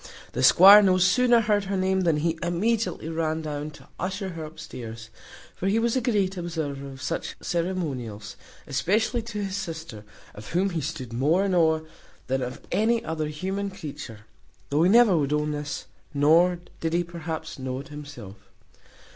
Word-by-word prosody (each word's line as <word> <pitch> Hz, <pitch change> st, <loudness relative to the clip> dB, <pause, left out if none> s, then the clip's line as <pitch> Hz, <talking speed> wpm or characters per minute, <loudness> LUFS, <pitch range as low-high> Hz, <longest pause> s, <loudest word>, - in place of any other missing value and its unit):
The -, -, -3 dB
squire 190 Hz, +10 st, +9 dB
no 185 Hz, -2 st, +4 dB
sooner 235 Hz, +6 st, +4 dB
heard 210 Hz, -2 st, +1 dB
her 195 Hz, 0 st, -2 dB
name, 190 Hz, 0 st, +1 dB
than 165 Hz, -4 st, +2 dB
he 165 Hz, +1 st, -1 dB
immediately 205 Hz, +2 st, 0 dB
ran 160 Hz, -1 st, -1 dB
down 150 Hz, 0 st, -4 dB
to 150 Hz, -, -15 dB
usher 190 Hz, +2 st, -3 dB
her 165 Hz, -3 st, -6 dB
upstairs; 115 Hz, -7 st, -9 dB, 0.4 s
for 190 Hz, -, -3 dB
he 200 Hz, +3 st, +2 dB
was 230 Hz, +1 st, +1 dB
a 260 Hz, -, +2 dB
great 200 Hz, -6 st, 0 dB
observer 155 Hz, -5 st, -4 dB
of 135 Hz, -1 st, -10 dB
such 165 Hz, -, -3 dB
ceremonials, 135 Hz, -, -3 dB, 0.3 s
especially 215 Hz, -, 0 dB
to 215 Hz, -2 st, -5 dB
his 195 Hz, -1 st, -3 dB
sister, 160 Hz, -, -6 dB, 0.3 s
of 105 Hz, +7 st, -10 dB
whom 190 Hz, +3 st, +2 dB
he 165 Hz, -2 st, -2 dB
stood 135 Hz, -5 st, -5 dB
more 155 Hz, +11 st, +2 dB
in 195 Hz, -, 0 dB
awe 160 Hz, -2 st, +3 dB, 0.4 s
than 130 Hz, +1 st, -1 dB
of 125 Hz, 0 st, -5 dB
any 225 Hz, +4 st, +2 dB
other 155 Hz, -1 st, -2 dB
human 190 Hz, +6 st, -3 dB
creature, 140 Hz, -, -8 dB, 0.5 s
though 145 Hz, +2 st, +2 dB
he 175 Hz, -, +5 dB
never 225 Hz, -3 st, +6 dB
would 145 Hz, -2 st, +1 dB
own 150 Hz, 0 st, 0 dB
this, 145 Hz, 0 st, -4 dB, 0.3 s
nor 165 Hz, +5 st, +4 dB, 0.2 s
did 160 Hz, 0 st, -2 dB
he 175 Hz, +1 st, +2 dB
perhaps 165 Hz, -3 st, -6 dB
know 130 Hz, -1 st, -3 dB
it 140 Hz, -, -10 dB
himself. 145 Hz, -10 st, -9 dB
165 Hz, 170 wpm, -26 LUFS, 145-190 Hz, 0.5 s, squire